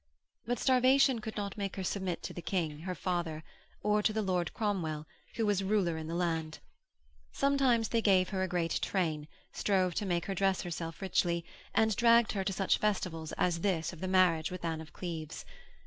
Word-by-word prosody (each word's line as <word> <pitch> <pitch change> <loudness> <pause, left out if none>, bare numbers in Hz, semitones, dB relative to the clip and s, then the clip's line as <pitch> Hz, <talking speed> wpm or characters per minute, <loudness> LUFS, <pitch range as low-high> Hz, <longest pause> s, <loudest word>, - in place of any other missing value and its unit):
But 245 +1 0
starvation 260 0 +4
could 220 0 -6
not 200 -1 -4
make 195 -2 -3
her 190 - -4
submit 185 -2 -2
to - - -5
the 175 - -6
King, 165 -5 -2
her 180 +3 -4
father, 170 -4 -2 0.4
or 210 0 +3
to 210 - +2
the 220 0 -1
Lord 180 -3 0
Cromwell 170 -8 -2 0.3
who 225 - 0
was 205 -2 +1
ruler 190 -4 +1
in 160 -1 -5
the 165 - -3
land. 165 -3 -1 0.7
Sometimes 270 -5 +2
they 230 - +1
gave 185 -4 +4
her 190 -2 -2
a 190 - +1
great 175 -2 -1
train, 160 -6 -1 0.3
strove 185 -3 +1
to 205 - -2
make 175 -2 0
her 195 - -2
dress 195 0 +1
herself 165 0 -5
richly, 170 -2 +1 0.3
and 220 -2 +3
dragged 235 0 +5
her 195 -2 -1
to 195 - -1
such 195 0 +1
festivals 180 -6 -1
as 175 -2 +1
this 170 -5 0
of 170 - -11
the 185 - -3
marriage 180 -4 +3
with 180 -1 -6
Anne 160 -1 -2
of 160 - -11
Cleves. 160 -4 -6
185 Hz, 195 wpm, -32 LUFS, 170-210 Hz, 0.7 s, dragged